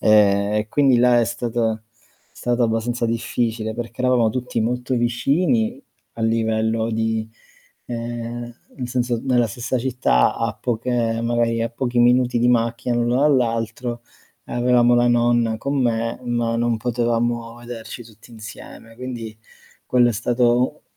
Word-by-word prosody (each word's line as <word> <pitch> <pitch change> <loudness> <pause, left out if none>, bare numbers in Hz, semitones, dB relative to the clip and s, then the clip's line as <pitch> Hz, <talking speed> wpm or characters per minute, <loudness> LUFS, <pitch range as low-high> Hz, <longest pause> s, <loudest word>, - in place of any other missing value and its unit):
Ehm, 100 -1 +4
e 105 0 -1
quindi 135 0 +3
là 120 0 +5
è - - +2
stato 115 -1 -2 0.5
è - - -26
stato 120 0 +2
abbastanza 115 +1 -1
difficile 115 -1 -2
perché 120 +1 -6
eravamo 125 -3 +3
tutti 125 0 -3
molto 125 +3 -1
vicini 180 - +1 0.3
a - - -7
livello 110 0 0
di, 110 0 -1 0.6
ehm, 120 0 -5 0.2
nel 125 -2 -5
senso, 120 -2 -1
nella 125 -3 +2
stessa 120 +4 -3
città 125 - +2
a - - -1
poche 115 -1 -1
magari 115 -1 +1
a 115 - -2
pochi 120 0 -1
minuti 125 0 +3
di 120 - +3
macchina 120 0 +1
l'uno 120 +2 +1
dall'altro 120 -3 0 0.4
e - - -10
avevamo 120 0 +3
la 120 0 +3
nonna 120 -1 +2
con 140 +4 -1
me, 115 -2 0
ma 120 -1 -1
non 120 0 +1
potevamo 120 0 -1
vederci 120 0 -8
tutti 110 +1 -18
insieme, 115 0 -11
quindi 120 -3 -6 0.5
quello 125 -1 +4
è - - 0
stato 120 +4 +1
120 Hz, 145 wpm, -21 LUFS, 115-125 Hz, 0.6 s, là